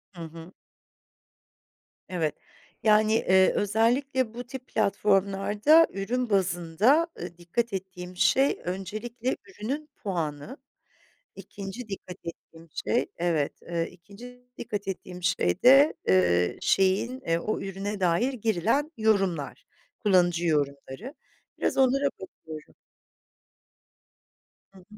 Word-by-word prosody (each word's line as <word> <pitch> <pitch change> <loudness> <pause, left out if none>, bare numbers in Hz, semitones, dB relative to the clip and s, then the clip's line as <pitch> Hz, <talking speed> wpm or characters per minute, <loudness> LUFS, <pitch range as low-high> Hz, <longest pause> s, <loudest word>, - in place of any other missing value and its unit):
Hı 170 - -9
hı. 165 +2 -10 1.6
Evet, 165 -5 -1 0.5
yani, 215 0 +4
eee, 190 -4 +4
özellikle 230 +4 +1
bu 245 +1 -6
tip 255 +1 -9
platformlarda 205 - +3
ürün 235 +5 -2
bazında, 195 - +2
eee, 175 0 -7
dikkat 200 +6 -2
ettiğim 180 -1 -6
şey 270 +8 +3
öncelikle 215 +7 -4
ürünün 295 - -5
puanı, 170 - -4 0.8
2'nci 200 +4 -8
dikkat 185 -2 -7
ettiğim 165 0 -10 0.2
şey 240 - +1
evet, 165 -4 -1
eee, 170 -1 -2
2'nci 225 +8 -14
dikkat 205 -3 -5
ettiğim 180 -1 -6
şey 180 - 0
de, 275 +4 +7
eee, 90 -1 +3
şeyin 195 +7 +1
e 165 0 +2
o 215 +5 -2
ürüne 195 +1 -4
dair 190 +9 +2
girilen 230 - 0
yorumlar, 195 -9 0 0.3
kullanıcı 175 -4 +3
yorumları. 145 - -2 0.5
Biraz - - 0
onlara 270 +2 +3 0.2
bakıyorum. 160 -4 -11 2.0
Hı 190 - -15
hı, - - -18
195 Hz, 105 wpm, -27 LUFS, 175-235 Hz, 2.0 s, de